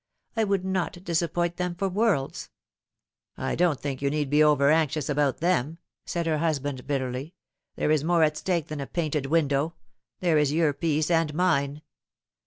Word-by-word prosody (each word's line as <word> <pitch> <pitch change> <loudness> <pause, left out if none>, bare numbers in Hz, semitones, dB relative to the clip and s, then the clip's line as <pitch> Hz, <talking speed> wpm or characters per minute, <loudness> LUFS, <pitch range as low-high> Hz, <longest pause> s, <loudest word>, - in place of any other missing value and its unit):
"I 225 -1 +2
would 195 -2 0
not 185 -1 -2
disappoint 175 0 -1
them 180 -1 -2
for 195 +3 -1
worlds." 190 -8 0 0.5
" - - -64
I - - -2
don't 170 -5 +2
think 140 -2 -4
you 140 - +1
need 145 -1 -2
be 150 +1 +5
over 145 -1 +4
anxious 155 -2 +1
about 145 -1 +1
them," 165 -3 +1 0.3
said 170 -2 -2
her 155 -2 0
husband 145 -5 -2
bitterly. 135 +3 -3 0.2
" - - -59
There 150 - 0
is 155 -2 +2
more 170 0 +3
at 155 -1 +2
stake 170 -1 -1
than 155 -2 -4
a 135 - -5
painted 150 -5 -2
window: 150 +1 +1 0.4
there 170 -4 +3
is 145 -2 +2
your 155 -1 +2
peace 155 +1 0
and 165 -2 +2
mine. 150 -4 +1
155 Hz, 185 wpm, -26 LUFS, 145-175 Hz, 0.5 s, be